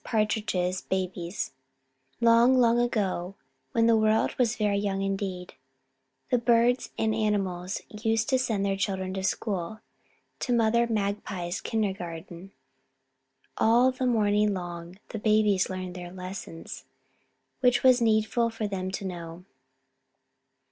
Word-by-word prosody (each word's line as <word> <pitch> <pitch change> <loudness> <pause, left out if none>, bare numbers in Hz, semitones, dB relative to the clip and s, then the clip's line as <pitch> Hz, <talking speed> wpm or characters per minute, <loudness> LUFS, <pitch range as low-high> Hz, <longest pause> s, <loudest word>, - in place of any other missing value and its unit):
PARTRIDGE'S 210 -5 0
BABIES 185 -1 -3 0.7
Long, 235 +2 +5
long 240 -1 +4
ago, 195 -6 -1 0.4
when 230 -1 +3
the 230 0 +5
world 220 0 +2
was 245 -2 +2
very 210 -3 +1
young 195 -1 -1
indeed, 195 -2 -3 0.8
the 250 - +4
Birds 235 +1 +3
and 220 0 +1
Animals 195 -4 -1
used 225 +1 -1
to 260 -2 +3
send 220 -6 0
their 195 -1 +1
children 190 -1 -2
to 190 - -3
school, 190 0 -2 0.6
to 250 - -2
Mother 235 0 +3
Magpie's 200 -4 -2
kindergarten. 185 -3 -4 1.1
All 240 +3 +4
the 255 0 -2
morning 210 -3 +2
long 175 0 -7
the 220 - -5
babies 210 -3 +3
learned 185 -1 -5
their 175 -1 -8
lessons 185 -2 -8 0.7
which 250 -1 +4
it - - -9
was 255 -2 +6
needful 225 +1 +2
for 225 -2 -3
them 185 -2 -3
to 195 +1 -5
know. 170 -1 -7
205 Hz, 125 wpm, -27 LUFS, 185-230 Hz, 1.1 s, was